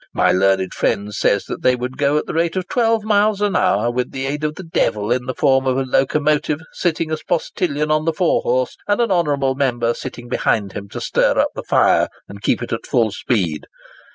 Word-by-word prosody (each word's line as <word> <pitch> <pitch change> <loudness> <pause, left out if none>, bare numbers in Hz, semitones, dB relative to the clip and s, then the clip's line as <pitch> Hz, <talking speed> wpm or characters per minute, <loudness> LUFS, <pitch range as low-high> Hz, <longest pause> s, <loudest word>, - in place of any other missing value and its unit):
My - - +3
learned 95 0 +2
friend 105 +1 -1
says 100 0 +1
that - - -6
they 125 - +3
would 125 +1 -5
go 145 0 +1
at - - -1
the - - -5
rate 165 +2 0
of 185 -1 -2
12 230 -3 +1
miles 210 -1 +2
an 205 -1 0
hour 110 +4 +2
with 125 0 -2
the 135 0 -4
aid 145 +2 -3
of 150 0 -1
the 190 - -8
devil 115 - -1
in 125 0 0
the 130 - -3
form 135 -2 +2
of 130 0 +1
a 135 - +1
locomotive, 145 +3 +1
sitting 165 -2 -1
as 155 - -2
postilion 155 -3 -1
on 155 0 +1
the 165 - +1
fore 175 +1 +1
horse, 130 +1 0
and 205 +1 +1
an 235 -3 +1
honourable 145 -7 +1
member 120 -4 0
sitting 120 -1 -8
behind 105 -4 0
him 100 -1 -7
to - - -7
stir - - +1
up - - +3
the - - -5
fire, - - +3 0.2
and 100 0 -11
keep - - 0
it - - -4
at - - -5
full 115 -3 +2
speed. 95 -8 -2
135 Hz, 225 wpm, -19 LUFS, 120-165 Hz, 0.2 s, My